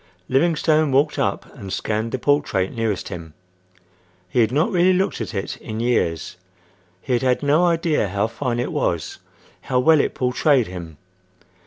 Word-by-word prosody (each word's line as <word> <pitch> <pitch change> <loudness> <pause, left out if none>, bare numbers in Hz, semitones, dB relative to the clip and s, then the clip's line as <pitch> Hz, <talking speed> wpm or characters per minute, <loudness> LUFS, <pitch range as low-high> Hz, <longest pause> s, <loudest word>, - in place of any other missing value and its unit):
Livingstone 155 +1 +2
walked 145 +3 +2
up - - -2
and 100 -8 -8
scanned 110 +3 -2
the 130 - -1
portrait 125 -9 0
nearest 110 -5 -2
him. 80 -3 -8 0.9
He 90 - -1
had 115 -1 +3
not 155 - +1
really 185 0 +4
looked 190 +1 0
at 115 - -5
it 95 - -3
in 110 -1 -6
years. 95 -8 -1 0.6
He 130 - -2
had 120 - +2
had 130 +1 +1
no 155 +5 +3
idea 165 -8 +1
how 100 +2 0
fine 120 +1 -3
it 120 - -2
was. 80 -3 -2 0.4
How 130 - -1
well 155 +4 +5
it - - 0
portrayed 130 +1 +2
him! 85 -4 -8
125 Hz, 165 wpm, -21 LUFS, 100-150 Hz, 0.9 s, well